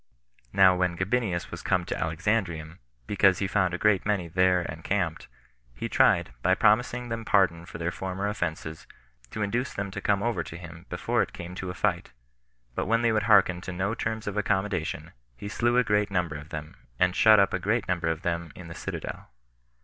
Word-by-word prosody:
4. - - -37
Now 95 -2 +6
when 90 -1 0
Gabinius 95 -1 -1
was - - -6
come 90 -2 0
to - - -3
Alexandrium, 85 -1 -2 0.3
because 100 +1 +3
he 100 - -1
found 95 -2 +1
a - - -3
great 105 -1 +3
many 100 -4 0
there 90 +1 +2
en 80 - -9
camped, 90 -4 -1 0.5
he - - -4
tried, - - +3
by 95 +6 +3
promising 120 +4 +2
them 115 0 -3
pardon 90 -6 +2
for - - -8
their 85 +1 -2
former 95 +2 -3
offenses, 80 -5 -4 0.4
to 105 - -3
induce 120 +5 -2
them 100 0 -3
to - - -5
come 100 -1 +1
over 120 -1 0
to 80 - -9
him 85 -1 -11
before - - 0
it - - -3
came 85 +1 -8
to 90 0 -5
a 90 - -5
fight; - - -1 0.6
but - - -2
when 115 +1 +2
they 115 - +4
would 110 -1 +1
hearken 95 -4 +5
to 95 - -6
no 95 +4 -1
terms 110 -1 -3
of 100 0 -4
accommodation, 95 -6 -1 0.3
he 100 - -7
slew 120 +3 +1
a 125 - +5
great 105 -2 +1
number 90 -5 -1
of 75 +1 -9
them, 75 0 -7 0.2
and 90 +4 +2
shut 110 -1 +7
up 100 -1 +3
a - - 0
great 110 +5 0
number 90 -2 -1
of 80 -1 -2
them 85 -2 -2
in 85 -2 -10
the - - -7
citadel. - - -6
95 Hz, 210 wpm, -27 LUFS, 85-105 Hz, 0.6 s, shut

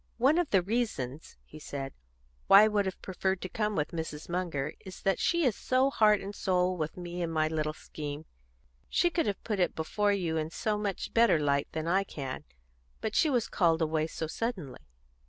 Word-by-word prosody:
"One 275 +8 +4
of 350 - 0
the 190 -3 +3
reasons," 175 - -3
he 155 - -12
said, 135 -2 -5 0.5
"why 200 +2 +9
I - - +6
would 210 -2 +1
have 190 - -4
preferred 190 0 -1
to 185 - -5
come 210 +2 -1
with 150 -2 0
Mrs. 160 -3 -5
Munger 170 -6 -2
is 190 - -10
that 195 -2 +2
she 340 -1 +2
is 240 -5 +2
so 260 +2 +2
heart 210 -4 +4
and 200 +1 -6
soul 185 -2 +1
with 155 -1 -4
me 175 0 -5
in 170 - -1
my 155 -1 +1
little 155 -1 -1
scheme. 150 0 -7 0.6
She 350 - +2
could 330 -6 0
have 200 -2 -2
put 210 -3 -2
it 180 - +1
before 205 +6 0
you 175 -5 0
in 155 0 -1
so 215 +5 -1
much 200 -3 -3
better 230 -7 +5
light 140 -2 +1
than 160 0 -3
I 190 +3 +3
can. 135 -8 -6 0.5
But 215 - -3
she 320 - +4
was 245 -5 +1
called 165 -4 +2
away 155 0 0
so 160 - -4
suddenly." 180 - -4
185 Hz, 205 wpm, -30 LUFS, 155-210 Hz, 0.6 s, why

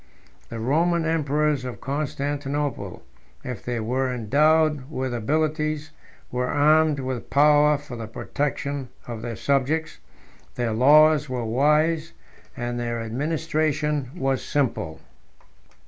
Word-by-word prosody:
The 115 - -6
Roman 165 +8 +1
emperors 150 -3 +1
of 125 -1 -6
Constantinople, 140 -4 -3 0.4
if 125 -5 -6
they 120 -1 -2
were 130 +4 -1
endowed 150 +4 +2
with 130 -4 -3
abilities, 155 +5 -1 0.4
were 125 0 -1
armed 150 +1 +3
with 130 -2 -4
power 150 +1 +5
for 140 -3 -9
the 115 -2 -6
protection 140 +2 -3 0.2
of 115 -2 -6
their 115 0 -4
subjects: 140 +5 0 0.6
their 120 -2 -1
laws 150 +4 +5
were 125 -2 -2
wise, 150 +7 +2 0.4
and 120 0 -3
their 120 -1 -2
administration 150 +3 -1
was 135 -5 0
simple. 115 - -1
140 Hz, 115 wpm, -24 LUFS, 125-150 Hz, 0.6 s, power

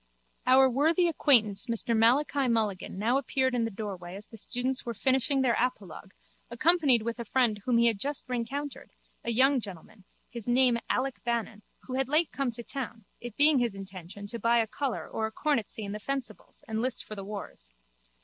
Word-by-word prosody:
_ - - -40 0.5
Our 265 +1 +7
worthy 315 +7 +2
acquaintance 235 -10 +3
Mr 230 0 -1
Malachi 265 +4 +3
Mulligan 215 -6 -1
now 235 +6 +2
appeared 260 0 0
in 240 -2 +1
the - - -2
doorway 190 -4 -6
as 205 +2 -9
the - - -12
students 250 +4 0
were 235 -2 -5
finishing 265 +3 +2
their 245 -2 +3
apologue 200 -6 -3 0.3
accompanied 275 -2 +3
with 235 +1 -4
a - - -2
friend 230 -2 +1
whom 245 -2 +2
he 235 - +4
had 225 -4 +3
just 285 +4 -3
rencountered, 260 +4 -4 0.3
a - - -3
young 260 +4 +4
gentleman, 195 -1 -10 0.2
his 235 -3 -8
name 245 -1 +4
Alec 265 +1 -1
Bannon, 230 -3 -2 0.2
who 255 - -8
had 265 0 -1
late 310 +3 +2
come 275 -2 -1
to 235 +1 -7
town, 230 -5 -6
it 240 -2 -9
being 290 -1 +6
his 235 -4 -1
intention 195 0 -9
to 230 +3 -6
buy 230 +2 +3
a 230 - +3
colour 265 +3 -3
or 220 - -2
a - - -9
cornetcy 230 -5 -1
in 200 - -5
the 210 - -5
fencibles 270 +3 -5
and 220 0 -2
list 255 +1 -1
for - - -8
the 200 -2 -6
wars. 200 - -8
235 Hz, 195 wpm, -29 LUFS, 215-265 Hz, 0.5 s, Our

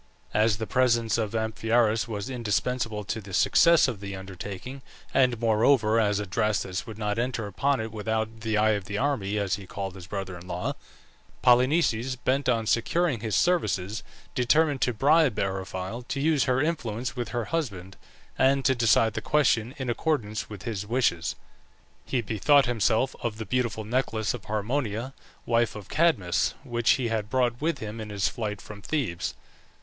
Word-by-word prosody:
As 105 0 +3
the 110 - -3
presence 115 -2 +2
of 110 0 -2
Amphiaraus 110 +1 +1
was 105 -1 -4
indispensable 115 -2 -1
to 110 +3 -4
the 95 -2 -6
success 170 -3 +5
of 120 -6 -4
the 100 -1 -6
undertaking, 95 +7 -7 0.3
and, 125 -4 +3
moreover, 115 0 +3
as 105 -2 +2
Adrastus 100 0 -1
would 110 -2 -8
not 105 0 -1
enter 120 -2 -1
upon 135 +7 0
it 110 0 -4
without 110 +1 -2
"the 110 -1 -1
eye 110 +1 +4
of 100 -3 -1
the 105 +1 -4
army," 105 -6 0
as 100 -2 0
he 100 -2 -11
called 95 0 -5
his 90 -2 -11
brother 95 -3 -5
in 90 +1 -11
law, 90 0 -2 0.7
Polynices, 125 -1 +3
bent 130 +2 0
on 115 -2 +1
securing 140 +5 +1
his 110 -1 -2
services, 110 - +1 0.3
determined 145 +3 +2
to 125 - +2
bribe 140 +2 +3
Eriphyle 95 +3 -3
to 140 - -3
use 150 -1 +2
her 130 0 +2
influence 130 -7 -2
with 120 -4 -3
her 120 +2 -2
husband 100 - -3 0.4
and 135 0 +3
to 130 - +5
decide 115 -2 +3
the - - -3
question 130 -4 +2
in 130 -2 -4
accordance 120 -4 -1
with 105 -4 -9
his 105 -4 -3
wishes. 110 -7 0 0.7
He 125 - 0
bethought 125 +7 +3
himself 120 +2 +1
of 115 -3 -3
the 110 - -5
beautiful 120 -3 -1
necklace 110 -1 -1
of 120 -5 -8
Harmonia, 115 +3 -2 0.3
wife 115 -2 +1
of 105 -3 -9
Cadmus, 100 - +2
which 120 -4 -1
he 125 -3 -1
had 110 -2 -2
brought 125 -1 0
with 160 -1 0
him 110 -1 -6
in 110 - -7
his 100 -2 0
flight 105 -3 -4
from 105 -1 -10
Thebes. 115 - -2
115 Hz, 170 wpm, -27 LUFS, 105-130 Hz, 0.7 s, success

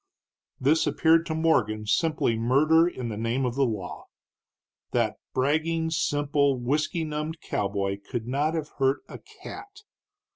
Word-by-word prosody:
This 155 +4 +3
appeared 165 0 +3
to 160 - -2
Morgan 135 -10 +1
simply 140 +1 +1
murder 150 +9 +4
in 130 -9 -4
the 105 - -5
name 115 +4 0
of 125 - -1
the 135 0 +2
law. 95 -7 -5 0.9
That - - +1
bragging, 160 +4 0
simple, 145 -2 +1
whisky 150 +6 0
numbed 155 +1 -4
cowboy 100 -4 -2
could 120 -4 -3
not 145 +6 0
have 155 -2 -3
hurt 135 +1 +2
a - - -9 0.2
cat. 405 +1 -9
145 Hz, 140 wpm, -26 LUFS, 120-160 Hz, 0.9 s, murder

